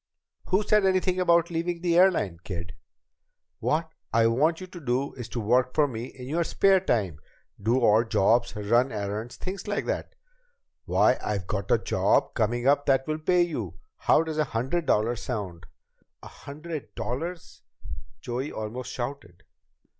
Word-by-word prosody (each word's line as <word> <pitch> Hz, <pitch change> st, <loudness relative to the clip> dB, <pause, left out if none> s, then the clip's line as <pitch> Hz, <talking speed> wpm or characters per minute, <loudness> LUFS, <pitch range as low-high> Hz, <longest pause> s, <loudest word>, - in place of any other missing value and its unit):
"Who 190 Hz, +3 st, +2 dB
said 210 Hz, 0 st, +3 dB
anything 185 Hz, -1 st, +2 dB
about 170 Hz, -1 st, +3 dB
leaving 170 Hz, +1 st, -2 dB
the 175 Hz, -1 st, +1 dB
airline, 170 Hz, -, +3 dB
kid? 90 Hz, -2 st, -6 dB, 0.9 s
What 160 Hz, +1 st, 0 dB, 0.2 s
I 115 Hz, 0 st, +4 dB
want 150 Hz, +9 st, +2 dB
you 185 Hz, -, -7 dB
to 180 Hz, -1 st, -11 dB
do 135 Hz, -1 st, -1 dB
is 120 Hz, -3 st, -8 dB
work 125 Hz, +3 st, +2 dB
for 150 Hz, -1 st, +4 dB
me 120 Hz, -3 st, -5 dB
in 125 Hz, 0 st, -10 dB
your 165 Hz, +5 st, 0 dB
spare 195 Hz, +3 st, +3 dB
time 100 Hz, -, -1 dB, 0.4 s
do 120 Hz, +4 st, +2 dB
odd 110 Hz, +2 st, +4 dB
jobs, 120 Hz, +5 st, +2 dB
run 120 Hz, +5 st, +2 dB
errands, 105 Hz, +3 st, -4 dB
things 185 Hz, +1 st, -6 dB
like 205 Hz, 0 st, -1 dB
that. -, -, -3 dB, 0.7 s
Why, -, -, +3 dB
I've 100 Hz, -3 st, -2 dB
got 100 Hz, +1 st, -3 dB
a -, -, +5 dB
job -, -, +1 dB
coming 120 Hz, +3 st, 0 dB
up 145 Hz, +1 st, +3 dB
that 135 Hz, -1 st, +3 dB
will 155 Hz, 0 st, -2 dB
pay 175 Hz, +3 st, +3 dB
you 120 Hz, -, -4 dB, 0.2 s
How 160 Hz, -, +3 dB
does 160 Hz, -1 st, -4 dB
a -, -, +4 dB
hundred 135 Hz, +8 st, -2 dB
dollars 115 Hz, +3 st, +1 dB
sound?" 100 Hz, -10 st, -5 dB, 0.6 s
"A -, -, -8 dB
hundred 150 Hz, +1 st, -8 dB
dollars!" 165 Hz, +8 st, -5 dB, 0.6 s
Joey 125 Hz, +4 st, -3 dB
almost 120 Hz, +4 st, -5 dB
shouted. 120 Hz, -8 st, -6 dB
130 Hz, 160 wpm, -26 LUFS, 110-170 Hz, 0.9 s, a